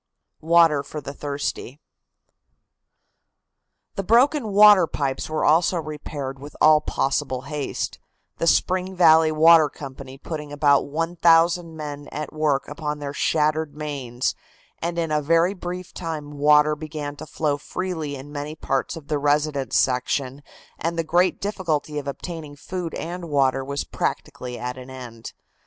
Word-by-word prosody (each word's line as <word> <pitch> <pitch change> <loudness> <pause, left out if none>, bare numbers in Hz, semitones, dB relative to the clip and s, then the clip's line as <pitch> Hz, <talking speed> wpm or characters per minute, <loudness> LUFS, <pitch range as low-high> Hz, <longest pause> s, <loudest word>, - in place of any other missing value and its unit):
WATER 165 -2 +4
FOR 145 +2 -7
THE 140 0 -7
THIRSTY. 145 -1 -4 2.1
The - - -2
broken 255 +6 +3
waterpipes 185 -11 +4
were 155 - -1
also 165 +4 +3
repaired 145 -4 -6
with 145 +2 -11
all 155 0 +6
possible 135 -3 -1
haste, 145 -1 -4 0.4
the 165 - 0
Spring 185 +2 +1
Valley 160 -2 +6
Water 160 0 +6
Company 135 -1 -9
putting 150 0 -6
about 145 -1 +3
one 165 +4 -3
thousand 165 0 +3
men 145 -1 -6
at 150 +1 -5
work 150 -3 0
upon 150 0 -4
their 145 -1 -5
shattered 155 0 0
mains, 135 -5 -3 0.5
and 170 +1 -3
in 165 -2 -1
a 150 0 +2
very 165 +5 +3
brief 180 -1 -7
time 160 -4 -5
water 150 +1 +5
began 150 -1 -6
to - - -9
flow 150 -2 -1
freely 160 -2 -4
in 140 +2 -10
many 145 +1 -5
parts 135 0 -2
of 155 -3 -10
the 150 -1 -1
residence 145 -1 +1
section 130 +2 0 0.4
and 170 0 -2
the 165 - +1
great 175 +3 +2
difficulty 160 -7 -2
of 145 - -8
obtaining 150 0 -6
food 175 +3 -5
and 175 0 -5
water 135 -2 +2
was 140 +1 -3
practically 125 -1 -4
at 125 +1 -5
an 130 +1 -10
end. 120 -3 -9
150 Hz, 145 wpm, -23 LUFS, 140-165 Hz, 2.1 s, all